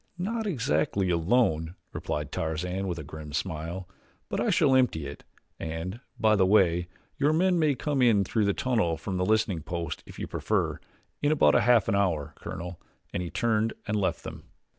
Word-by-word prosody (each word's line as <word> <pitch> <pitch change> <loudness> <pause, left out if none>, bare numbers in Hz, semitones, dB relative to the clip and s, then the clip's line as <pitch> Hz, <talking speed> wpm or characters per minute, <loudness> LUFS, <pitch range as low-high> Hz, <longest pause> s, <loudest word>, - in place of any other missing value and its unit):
"Not 220 +5 -2
exactly 95 - +1
alone," 85 -2 +2 0.2
replied 75 -2 -3
Tarzan 90 +4 -2
with 90 -2 -2
a 75 - -5
grim 75 0 -9
smile; 85 +2 -3 0.4
"but - - -2
I - - +1
shall 130 - +4
empty 125 - +2
it, 70 +1 -8 0.4
and, 80 +6 -4 0.2
by 110 -1 +4
the 95 - +4
way, 90 -3 +4 0.3
your 145 +2 +4
men 180 +2 +3
may 150 -3 +3
come 145 0 -1
in 115 -5 +5
through 105 +3 0
the 100 - +2
tunnel 110 -11 +1
from 95 +3 -4
the 90 - +1
listening 110 -6 +2
post 85 -1 -4
if - - -11
you - - -3
prefer. - - -1 0.4
In 145 - +2
about 155 - +5
half 120 -4 +4
an - - +1
hour, 85 -7 0
Colonel," 90 0 -7 0.3
and - - -1
he 90 - -4
turned 110 +1 +1
and 105 - 0
left 100 -3 0
them. - - -8
95 Hz, 185 wpm, -28 LUFS, 80-120 Hz, 0.4 s, in